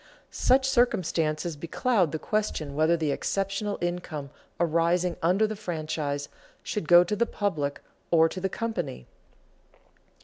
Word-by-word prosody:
Such 265 +1 +3
circumstances 175 -10 +1
becloud 175 - 0
the 155 - -2
question 165 -7 -2
whether 155 +3 +3
the 155 -3 0
exceptional 195 +5 -2
income 170 -5 -4 0.3
arising 170 +1 +2
under 185 +6 +3
the 215 0 -3
franchise 155 -7 -3 0.4
should 205 -7 -3
go 175 +1 +8
to 195 +4 -2
the 235 +3 +1
public 150 -9 -2 0.3
or 165 -1 +5
to 185 +3 -6
the 190 - 0
company. 175 - -4
175 Hz, 130 wpm, -27 LUFS, 155-205 Hz, 0.4 s, go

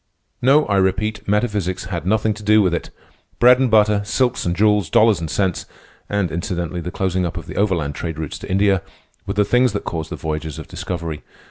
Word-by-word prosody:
No, 140 +4 +4
I 100 - +1
repeat, 105 +3 0
metaphysics 105 -3 0
had 85 -2 -5
nothing 110 +1 +2
to 105 - -11
do 105 0 +4
with 90 -3 +1
it. 85 - -3 0.5
Bread 125 +1 +6
and 130 -2 +2
butter, 105 -2 +4
silks 125 0 0
and 85 - 0
jewels, 105 -3 +2
dollars 110 0 +4
and 80 -2 -4
cents, 95 +1 -1 0.4
and, 100 -5 0
incidentally, 85 +1 -3
the 85 - -5
closing 95 0 -1
up 85 - -3
of - - -6
the - - -9
overland 90 -8 0
trade 80 +1 -5
routes 80 -2 -5
to - - -9
India, 95 0 +2 0.5
were - - -3
the 105 0 +3
things 125 0 +3
that 105 - -3
caused 80 -2 -4
the - - -4
voyages 80 -1 -4
of 80 - -8
discovery. 85 -4 -5
95 Hz, 210 wpm, -20 LUFS, 85-105 Hz, 0.5 s, Bread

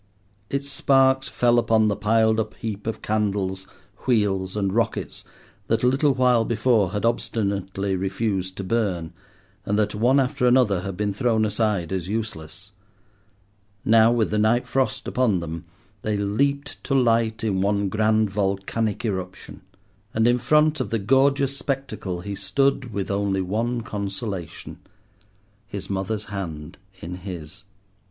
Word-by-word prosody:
Its 140 0 -2
sparks 135 -1 +3
fell 120 -1 +3
upon 110 -2 +3
the 100 - +1
piled 110 +1 +2
up 110 -1 -3
heap 105 -2 -5
of 115 - -4
candles, 100 -3 -1 0.4
wheels, 100 -5 +1
and 100 -2 0
rockets 115 0 -1 0.4
that 115 +1 +1
a - - +5
little 135 +2 +3
while 125 -2 +4
before 115 -4 +2
had 105 +2 -2
obstinately 100 -4 -1
refused 95 0 -2
to 100 - -4
burn, 95 -5 -1 0.5
and 105 - 0
that, 105 -1 +1
one 120 +6 +3
after 130 -1 +1
another, 120 -7 +4
had 95 -1 -5
been 105 0 -1
thrown 110 +1 +1
aside 105 -5 0
as 95 -2 -2
useless. 95 -3 -5 1.1
Now 115 0 +6
with 115 -2 +1
the 105 - +1
night 110 +3 +3
frost 135 -1 -1
upon 120 -8 +1
them, 85 0 -6 0.4
they 105 -1 -1
leaped 140 +8 -1
to 135 - 0
light 115 -3 +2
in 100 -4 0
one 100 0 +1
grand 110 +1 +2
volcanic 100 +3 -1
eruption. 95 -3 -5 0.5
And 110 +1 +3
in 120 +1 +3
front 150 +4 +3
of - - -2
the 115 - 0
gorgeous 135 +5 +2
spectacle 125 -11 -3
he 100 +3 -5
stood 125 +6 0
with 100 -1 -3
only 100 -1 0
one 115 +6 -1
consolation—his 100 0 -8
mother's 100 +3 -2
hand 85 -8 -6 0.2
in 90 +2 -6
his. 90 0 -8
105 Hz, 145 wpm, -24 LUFS, 95-120 Hz, 1.1 s, Now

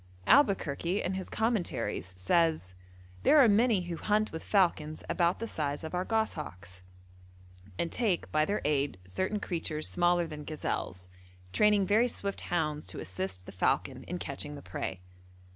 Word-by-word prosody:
Albuquerque 195 - +3
in 185 - -1
his 190 -1 -4
'Commentaries' 210 - -1
says: 155 - +1 0.5
'There 310 - +5
are 265 - +8
many 220 -1 +4
who 175 -1 -5
hunt 215 +3 +1
with 160 - -5
falcons 160 -6 +1
about 175 0 +2
the 230 - -4
size 145 -6 -2
of 160 - -6
our 180 0 0
goshawks, 150 - -3 1.0
and 170 - -1
take 210 -8 0
by 155 0 +3
their 200 +6 -1
aid 145 -6 +1
certain 190 - -2
creatures 160 -5 -3
smaller 175 0 +2
than 150 -2 -7
gazelles, 95 - -4 0.5
training 210 -2 +4
very 220 +5 +4
swift 200 -4 -4
hounds 150 - -1
to 90 - -5
assist 95 +1 -4
the - - -9
falcon 95 - 0
in - - -4
catching - - -4
the - - -10
prey.' 90 -1 -5
170 Hz, 155 wpm, -30 LUFS, 145-205 Hz, 1.0 s, are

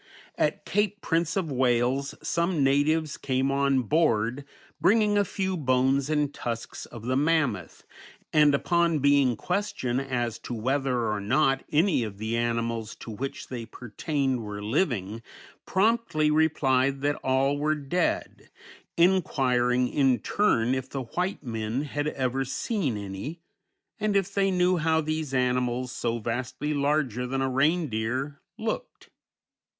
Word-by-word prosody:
At - - -1
Cape 205 0 0
Prince 165 +2 0
of 170 -6 -1
Wales 130 +1 +1
some 170 -3 0
natives 145 +3 +2
came 135 0 0
on 140 -1 +2
board 125 -2 +1 0.4
bringing 210 +4 +4
a 205 - +4
few 190 -1 -2
bones 135 -1 +1
and 150 -2 0
tusks 115 -1 -5
of 115 -2 -10
the 130 +2 0
mammoth, 140 - 0 0.5
and 150 -2 +5
upon 170 +2 +2
being 140 -3 +3
questioned 135 - -2
as 120 -4 -2
to 120 - -6
whether 125 0 0
or 105 - -1
not 135 +5 +2
any 160 -1 +3
of 105 -4 -5
the 110 +2 -2
animals 115 -1 -1
to 115 - -9
which 135 +6 -6
they 120 -3 -5
pertained 130 +3 -2
were 105 -1 -6
living, 110 - -1 0.5
promptly 190 -7 +2
replied 140 -4 +2
that 145 +1 +2
all 135 +2 +1
were 155 +1 +1
dead, 150 +5 -2 0.5
inquiring 125 -9 +2
in 135 -2 +2
turn 120 - +1
if 130 0 -3
the 135 -2 -4
white 180 - -3
men 115 +2 -2
had 145 0 -3
ever 135 -2 -1
seen 140 - -2
any, 100 - -6 0.6
and 210 -1 0
if 195 0 +1
they 195 -1 +2
knew 180 -1 +2
how 160 0 +2
these 155 -2 -2
animals, 125 -1 0
so 120 -2 -2
vastly 125 +6 -3
larger 140 -4 0
than 135 +1 -1
a - - +1
reindeer, 135 -2 0 0.2
looked. - - -5
135 Hz, 140 wpm, -27 LUFS, 120-155 Hz, 0.6 s, and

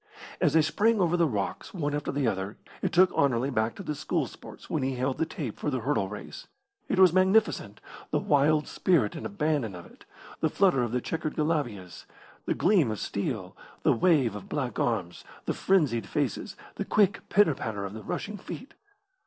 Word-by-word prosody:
As - - +3
they 160 -1 +5
sprang 220 +7 +2
over 175 -2 +2
the 170 -2 +3
rocks 105 - -3
one 145 -4 -1
after 145 0 -2
the 140 -1 -1
other, 95 0 -2 0.2
it - - 0
took 185 +1 +4
Anerley 135 -1 +2
back 110 -1 0
to 200 - -8
the 150 - -2
school 145 - -1
sports - - -12
when 155 - -1
he 130 0 -1
held 130 +1 -1
the 160 - +1
tape 140 -8 -5
for - - -1
the 130 -4 -2
hurdle 115 -6 0
race. 105 0 -8 0.4
It - - 0
was 185 -3 +7
magnificent, 185 - +2 0.3
the - - +1
wild 150 +1 +3
spirit 150 - +1
and 110 - -4
abandon 125 -2 -1
of 85 - -9
it, - - -18 0.3
the 160 - +1
flutter 180 -6 +3
of 120 -2 -1
the 125 0 0
chequered 155 +2 -3
galabeeahs, 130 - -2 0.4
the - - +1
gleam 180 - +3
of 110 - -2
steel, 100 -3 -3 0.3
the 145 - +5
wave 135 - +3
of 105 - -9
black 130 -4 -2
arms, 95 -8 -1 0.2
the - - 0
frenzied 140 - +1
faces, 150 - -2 0.2
the - - -1
quick 205 +1 +2
pitter 205 -7 +5
patter 105 -6 -4
of 100 - -6
the 110 - -7
rushing 205 - -4
feet. 265 - -8
145 Hz, 195 wpm, -28 LUFS, 110-170 Hz, 0.4 s, was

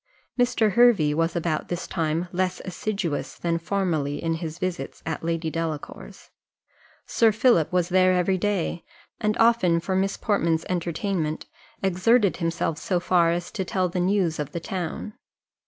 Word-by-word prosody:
Mr. 245 -4 +2
Hervey 220 -11 +5
was 165 +2 0
about 165 -2 -1
this 175 0 -4
time 165 0 -1
less 185 0 -1
assiduous 185 -4 -3
than 170 -1 -1
formerly 165 -6 -1
in 165 0 -1
his 165 -1 -5
visits 185 -1 -4
at 160 0 -4
Lady 165 -1 -1
Delacour's; 160 -2 -6 0.7
Sir 225 -1 +3
Philip 210 - +3
was 180 -1 +1
there 185 0 +4
every 185 +1 +1
day, 185 -4 -1 0.4
and 210 -1 0
often 225 -8 +4
for 185 +3 -2
Miss 195 +1 0
Portman's 170 -6 0
entertainment 170 -2 -2 0.4
exerted 195 +3 +3
himself 165 -2 -1
so 180 -2 0
far 175 -1 +3
as 175 +1 -2
to 190 - -2
tell 185 0 0
the 180 +1 -3
news 180 -3 +1
of 150 - -4
the 170 - -2
town. 180 +4 -5
175 Hz, 155 wpm, -25 LUFS, 165-195 Hz, 0.7 s, Hervey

